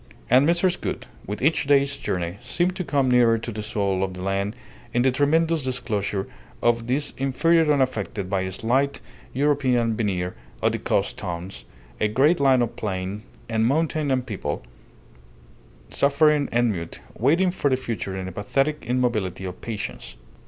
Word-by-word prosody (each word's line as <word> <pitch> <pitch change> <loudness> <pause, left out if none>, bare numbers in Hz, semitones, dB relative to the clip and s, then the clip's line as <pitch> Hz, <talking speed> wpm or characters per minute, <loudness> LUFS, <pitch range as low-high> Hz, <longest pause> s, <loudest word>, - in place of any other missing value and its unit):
And 130 +5 +6
Mrs. 175 +1 +2
Gould, - - -3 0.2
with 105 +4 -4
each 155 -1 +2
day's 140 0 +3
journey, 90 -3 -3
seemed 180 +1 0
to 185 - -2
come 140 -5 +1
nearer 120 -2 +5
to 115 +1 -5
the 105 0 -5
soul 100 -3 -1
of 95 -1 -3
the 90 - -7
land 100 +2 -1 0.4
in 120 - +3
the 130 - +4
tremendous 160 +4 +2
disclosure 110 -6 -1 0.3
of 120 0 +1
this 135 +4 0
interior 160 +4 +3
unaffected 120 -8 0
by 95 0 0
the 95 - -3
slight 130 +8 0 0.3
European 130 -5 +2
veneer 90 -5 -1 0.3
of - - +2
the - - -3
coast - - 0
towns, 85 -7 -6 0.3
a 110 - +2
great 140 +10 +3
land 135 -3 +4
of 115 - -4
plain 95 0 -3 0.3
and 115 0 +1
mountain 155 +1 +1
and 130 -2 +1
people, 90 - -4 1.3
suffering 145 +1 +3
and 120 0 +2
mute, 85 -4 -6 0.2
waiting 165 - +3
for 145 -5 0
the 130 - +2
future 110 -6 -4
in 95 -1 -4
a - - -5
pathetic 135 - -1
immobility 120 -7 0
of 90 -1 -7
patience. 65 - -5
120 Hz, 165 wpm, -24 LUFS, 100-140 Hz, 1.3 s, And